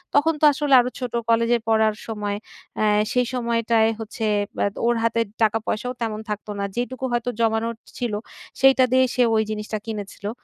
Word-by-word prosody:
তখন 320 +3 +4
তো - - +6
আসলে 290 0 0
আরো 245 0 +1
ছোট 250 -2 -4 0.2
কলেজে 230 +1 +3
পড়ার 220 -1 +3
সময়। 210 -2 -3 0.4
অ্যা 215 - +2 0.3
সেই 250 0 +2
সময়টায় 230 -2 +2
হচ্ছে 225 0 -4 0.3
ব্যা - - +2 0.2
ওর 240 0 +3
হাতে 230 0 +1 0.2
টাকা-পয়সাও 225 +3 0
তেমন 220 -2 -2
থাকত 210 0 -4
না। - - -1
যেইটুকু 255 +2 -3
হয়তো 240 0 0
জমানোর 225 +1 +1 0.2
ছিল, 240 -3 -2 0.5
সেইটা 270 -1 +6
দিয়েই 260 -1 +4
সে 250 - +5
ওই 220 - +3
জিনিসটা 210 0 -5 0.2
কিনেছিলো। 205 -1 -5
230 Hz, 165 wpm, -23 LUFS, 220-250 Hz, 0.5 s, তো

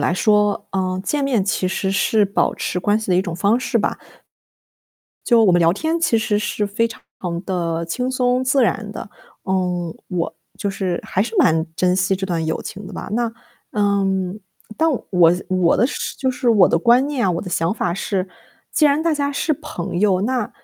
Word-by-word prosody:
来 - - +1
说， 210 +1 +2
呃， 185 -1 -1
见 295 -1 0
面 250 -8 +1
其 190 -2 0
实 190 +1 -1
是 210 +1 +2
保 200 0 0
持 180 - -3
关 205 +3 +2
系 215 - -4
的 180 - +4
一 185 - +4
种 175 -3 -4
方 205 +7 +2
式 260 -2 -1
吧。 - - -1 1.3
就 235 -2 +5
我 200 - +5
们 175 - +4
聊 165 -1 +4
天 320 - -1
其 235 -9 +2
实 210 -1 0
是 210 0 -1
非 220 +3 0
常 230 - -10 0.5
地 170 -3 -1
轻 250 +10 -2
松 255 0 +1
自 260 0 +3
然 215 -2 -1
的。 - - -7 0.4
嗯， 180 -3 -1
我 175 -4 -2 0.2
就 200 - -2
是 185 -3 -2
还 190 - 0
是 225 +1 -5
蛮 160 0 +3
珍 180 0 +2
惜 185 +1 +2
这 190 0 -3
段 170 -3 -1
友 160 0 -2
情 200 0 -8
的 195 - -10
吧， - - -6
那 235 0 0 0.4
嗯， 195 -2 0 0.4
但 325 +1 +2 0.2
我 175 -3 +5
的 180 - -4
我 185 -2 +2
的 240 - +3
是 285 - -4
就 260 - +1
是 250 -1 -1
我 205 -5 +6
的 - - +2
观 240 +8 +4
念 285 -5 -1
啊， - - +2
我 170 - -1
的 185 - -7
想 165 +1 0
法 175 -5 -1
是， 190 0 -2 0.5
既 310 - +3
然 290 +2 +2
大 330 -1 +2
家 285 -1 -1
是 310 +3 0
朋 230 - -5
友， 195 -3 +3
那 245 0 -1
200 Hz, 225 characters per minute, -20 LUFS, 180-240 Hz, 1.3 s, 我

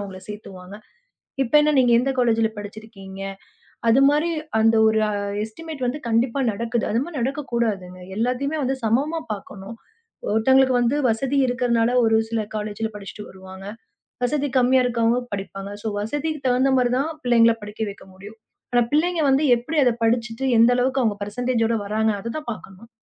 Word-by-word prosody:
அவங்கள 195 -2 -7
சேர்த்துவாங்க. 195 -2 -9 0.7
இப்ப 235 - -5
என்ன 300 0 +3
நீங்க 245 -2 +4
எந்த 270 +3 +1
காலேஜ்ல 225 -2 +3
படிச்சிருக்கீங்க? 205 -2 -10 0.7
அது 235 +4 +5
மாரி 300 +4 +1 0.3
அந்த 225 +1 +4
ஒரு 220 0 +2 0.4
எஸ்ட்டிமேட் 275 +4 -6
வந்து 285 +5 -3
கண்டிப்பா 235 +3 +1
நடக்குது. 230 +3 -2
அது 230 - +1
மாரி 335 +1 -9
நடக்கக் 270 +3 -3
கூடாதுங்க. 195 -6 -2 0.2
எல்லாத்தையுமே 255 +6 -1
வந்து 265 +1 0
சமமா 275 +9 +1
பார்க்கணும். 200 +2 -9 0.5
ஒருத்தங்களுக்கு 260 +4 +4
வந்து 240 +4 +1
வசதி 270 +5 0
இருக்கிறதுனால 240 -1 +1
ஒரு 225 - +3
சில 225 -1 -1
காலேஜ்ல 215 +1 -3
படிச்சுட்டு 210 +1 -8
வருவாங்க. 190 0 -12 0.6
வசதி 290 +2 0
கம்மியா 255 +1 +4
இருக்கவங்க 235 0 +1 0.2
படிப்பாங்க. 195 0 -6
சோ 225 - -2
வசதிக்கு 295 +8 -3
தகுந்த 255 +2 +3
மாரிதான் 255 +5 +1
பிள்ளைங்கள 230 -2 +5
படிக்க 210 +1 -5
வைக்க 200 - -13
முடியும். 205 +4 -12 0.3
ஆனா 245 - +4
பிள்ளைங்க 335 +3 +2
வந்து 275 +3 +3
எப்டி 300 +7 -3
அத 245 - +4
படிச்சுட்டு 230 +2 0 0.2
எந்த 230 - +6
அளவுக்கு 260 +2 +1
அவங்க 215 -4 +1
பர்சென்டேஜ் 240 +2 -1
ஓட 230 - +1
வர்றாங்க 220 +2 0
அதத்தான் 235 +7 -6
பார்க்கணும். 210 +1 -12
230 Hz, 155 wpm, -22 LUFS, 215-260 Hz, 0.7 s, எந்த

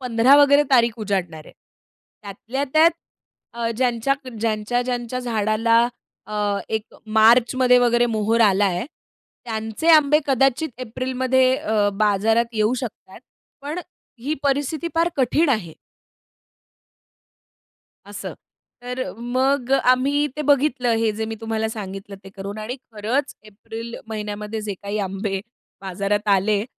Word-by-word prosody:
15 250 +2 +4
वगैरे 285 0 +6
तारीख 235 -3 +4
उजाडणार 180 -7 -3
आहे. - - -15 0.7
त्यातल्या 225 +7 -4
त्यात 320 +2 +6 0.6
अ, 230 -1 -2
ज्यांच्या 250 +1 +1 0.3
ज्यांच्या-ज्यांच्या 240 +3 -1
झाडाला 225 0 +1 0.5
अ, 205 -1 -1
एक 220 -1 -1 0.4
मार्चमध्ये 250 +3 +5
वगैरे 240 0 +3
मोहोर 225 0 0
आलाय. 195 -2 +3 0.6
त्यांचे 220 +7 -3
आंबे 300 -1 +6
कदाचित 270 +3 +2
एप्रिलमध्ये 255 +2 +1
अ, 210 -1 +1
बाजारात 225 +3 +2
येऊ 215 +3 +1
शकतात. 235 -4 -7 0.4
पण 300 +4 -4 0.4
ही 295 +5 -2
परिस्थिती 290 +4 -1
फार 335 +1 +2
कठीण 280 +5 +2
आहे. 215 -11 -1 2.3
असं. - - -7 0.5
तर 250 +1 -4
मग 255 +2 0
आम्ही 275 +3 +3
ते 300 - -2
बघितलं 270 -4 +2
हे 225 -1 +1
जे 220 - -1
मी 225 0 -5
तुम्हाला 220 0 -2
सांगितलं 195 -2 -7
ते - - -10
करून 200 +2 -6
आणि 230 +5 -5 0.2
खरंच 230 +7 -2
एप्रिल 225 +2 -9
महिन्यामध्ये 210 0 -5
जे 205 -1 -4
काही 200 +1 -3
आंबे 195 0 -3 0.4
बाजारात 200 +2 -2
आले 200 +1 +2
230 Hz, 120 wpm, -22 LUFS, 210-260 Hz, 2.3 s, वगैरे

